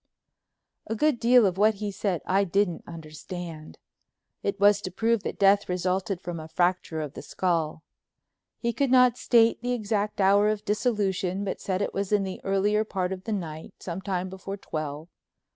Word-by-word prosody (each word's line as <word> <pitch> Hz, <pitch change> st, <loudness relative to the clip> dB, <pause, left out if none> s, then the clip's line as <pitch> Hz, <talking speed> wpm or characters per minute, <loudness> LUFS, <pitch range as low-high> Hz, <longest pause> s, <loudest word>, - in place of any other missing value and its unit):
A 225 Hz, -, -2 dB
good 295 Hz, +1 st, +2 dB
deal 240 Hz, 0 st, +6 dB
of 190 Hz, -1 st, 0 dB
what 215 Hz, +1 st, +4 dB
he 205 Hz, 0 st, -4 dB
said 190 Hz, -3 st, -2 dB
I 195 Hz, +2 st, +2 dB
didn't 195 Hz, -2 st, 0 dB
understand—it 165 Hz, +4 st, -8 dB
was 205 Hz, 0 st, +5 dB
to 185 Hz, -, -4 dB
prove 225 Hz, +4 st, +1 dB
that -, -, -5 dB
death 200 Hz, 0 st, +4 dB
resulted 185 Hz, +2 st, -1 dB
from 170 Hz, -1 st, -5 dB
a 155 Hz, -, -8 dB
fracture 175 Hz, -2 st, 0 dB
of 150 Hz, -2 st, -5 dB
the -, -, -8 dB
skull. 165 Hz, -4 st, -1 dB, 0.7 s
He 235 Hz, -1 st, -1 dB
could 275 Hz, +1 st, 0 dB
not 250 Hz, -2 st, +5 dB
state 230 Hz, -2 st, +4 dB
the 245 Hz, +1 st, -1 dB
exact 210 Hz, -2 st, -2 dB
hour 200 Hz, +2 st, +5 dB
of 215 Hz, -1 st, -2 dB
dissolution, 200 Hz, -4 st, 0 dB
but 190 Hz, -, -4 dB
said 190 Hz, 0 st, -1 dB
it -, -, -3 dB
was 200 Hz, 0 st, -2 dB
in 205 Hz, -1 st, +3 dB
the 190 Hz, -1 st, -5 dB
earlier 200 Hz, +2 st, +2 dB
part 190 Hz, -4 st, -2 dB
of 185 Hz, 0 st, -9 dB
the 225 Hz, -, -3 dB
night, 160 Hz, -5 st, -6 dB
some 180 Hz, +1 st, -5 dB
time 185 Hz, -2 st, -2 dB
before 190 Hz, +1 st, -7 dB
twelve. 155 Hz, -3 st, -5 dB
195 Hz, 175 wpm, -26 LUFS, 180-210 Hz, 0.7 s, deal